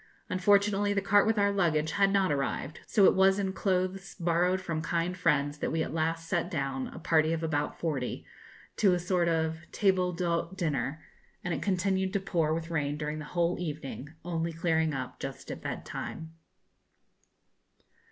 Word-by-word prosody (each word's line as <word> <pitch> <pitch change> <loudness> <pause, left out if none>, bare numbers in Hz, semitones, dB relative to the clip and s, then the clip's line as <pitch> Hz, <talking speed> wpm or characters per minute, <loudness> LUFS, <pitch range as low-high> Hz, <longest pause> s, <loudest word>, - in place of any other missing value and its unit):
Unfortunately 200 +2 +3
the 200 - +2
cart 205 +1 +4
with 220 0 +2
our 200 0 +3
luggage 160 -6 +1
had 195 +2 +3
not 195 -4 +3
arrived, 140 +2 -2
so 200 - +4
it - - +7
was 190 +1 +4
in 195 -2 -1
clothes 190 0 -1
borrowed 175 +1 +1
from 165 -4 -3
kind 170 +2 -1
friends 150 -4 +1
that - - -1
we 160 0 +1
at - - -5
last 165 +1 -1
sat 175 0 0
down, 135 -6 -2
a - - -10
party 160 -1 +2
of 165 0 -2
about 150 -2 -1
forty, 145 -7 -2 0.5
to 195 -4 +4
a - - -1
sort 175 -1 +1
of 160 -1 0
table 185 -3 +2
d'hôte 170 +1 -2
dinner, 150 -4 -2 0.4
and 175 - -1
it - - -3
continued 190 0 0
to 200 - +2
pour 170 -5 0
with 165 +1 -2
rain 145 -2 -1
during 150 0 -3
the 150 - -6
whole 170 +2 0
evening, 150 -4 -5
only 170 -1 -1
clearing 160 -1 +1
up 130 -3 -5
just 135 -1 -6
at - - -6
bed - - -5
time. 160 0 -6
170 Hz, 180 wpm, -29 LUFS, 155-190 Hz, 0.5 s, it